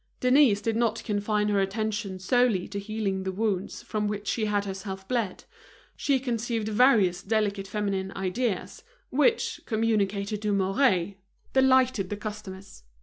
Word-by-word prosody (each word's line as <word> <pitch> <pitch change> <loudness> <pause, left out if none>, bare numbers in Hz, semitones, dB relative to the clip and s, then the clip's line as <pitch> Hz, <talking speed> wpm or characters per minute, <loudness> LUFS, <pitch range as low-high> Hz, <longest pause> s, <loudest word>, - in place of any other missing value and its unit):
Denise 250 -5 +4
did 225 +1 -1
not 230 -1 0
confine 210 0 0
her 205 -1 +2
attention 205 0 -2
solely 215 0 +2
to 200 - -4
healing 200 -2 -2
the 190 0 -3
wounds 200 -1 -2
from 210 -1 -2
which 205 0 -4
she 220 - 0
had 205 -1 0
herself 190 0 -6
bled; 230 -7 -2 0.5
she 275 -2 +1
conceived 235 -3 -2
various 210 -6 +4
delicate 200 -1 -1
feminine 195 -1 -2
ideas, 195 +2 -2 0.3
which, 465 -2 +1
communicated 210 -2 0
to 210 -1 0
Mouret, 195 -1 +2 0.4
delighted 260 -6 +3
the 205 - -3
customers. 205 - -8
210 Hz, 140 wpm, -27 LUFS, 195-225 Hz, 0.5 s, Denise